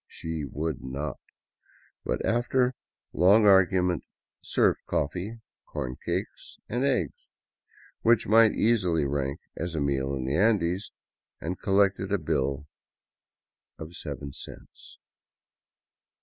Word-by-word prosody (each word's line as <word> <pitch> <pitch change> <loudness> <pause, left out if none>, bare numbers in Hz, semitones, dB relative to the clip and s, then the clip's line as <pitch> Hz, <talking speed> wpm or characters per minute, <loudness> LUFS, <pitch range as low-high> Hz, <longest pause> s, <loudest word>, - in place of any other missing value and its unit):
She 80 -2 -5
would 75 +2 -4
not, 70 +2 -4 0.8
but - - -2
after 125 +2 +2 0.4
long 100 +5 +5
argu 95 -2 +5
ment 90 -2 -1 0.4
served - - +2
coffee, 100 +9 -2 0.3
corn 65 0 -4
cakes, - - -4
and 120 +3 -1
eggs 125 - -1 0.4
— - - -28
which 115 -1 +4
might 110 0 +6
easily 90 -9 +2
rank 70 0 -2
as 85 0 -4
a - - 0
meal 70 -1 0
in 65 -1 -3
the 70 +3 -1
Andes 95 -1 +1 0.2
— - - -65
and 90 +3 -4
collected 100 -1 +2
a 100 - +3
bill 70 -3 -1 1.1
of 80 +2 -9
seven 70 -1 -6
cents. - - -12
90 Hz, 120 wpm, -27 LUFS, 70-105 Hz, 1.1 s, might